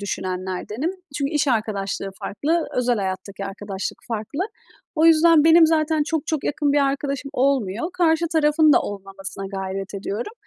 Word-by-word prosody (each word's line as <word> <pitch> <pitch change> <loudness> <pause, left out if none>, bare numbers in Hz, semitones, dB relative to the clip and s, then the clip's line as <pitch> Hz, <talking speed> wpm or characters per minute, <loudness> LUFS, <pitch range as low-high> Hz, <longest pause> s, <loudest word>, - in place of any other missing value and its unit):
düşünenlerdenim. 190 - -3 0.3
Çünkü 280 0 -1
iş 295 -1 +1
arkadaşlığı 200 -4 -1
farklı, 315 +9 -1
özel 245 -1 +2
hayattaki 195 0 -4
arkadaşlık 195 0 -5
farklı. 225 - -4 0.5
O 320 0 +4
yüzden 325 -1 +6
benim 325 0 +7
zaten 315 -1 +2
çok 320 -1 -2
çok 315 -3 -2
yakın 290 -1 0
bir 290 - +3
arkadaşım 275 0 -3
olmuyor. 255 - 0
Karşı 335 -1 +2
tarafın 305 -1 +4
da - - +5
olmamasına 195 0 -7
gayret 195 0 -5
ediyorum 205 - -4
255 Hz, 145 wpm, -22 LUFS, 195-310 Hz, 0.5 s, benim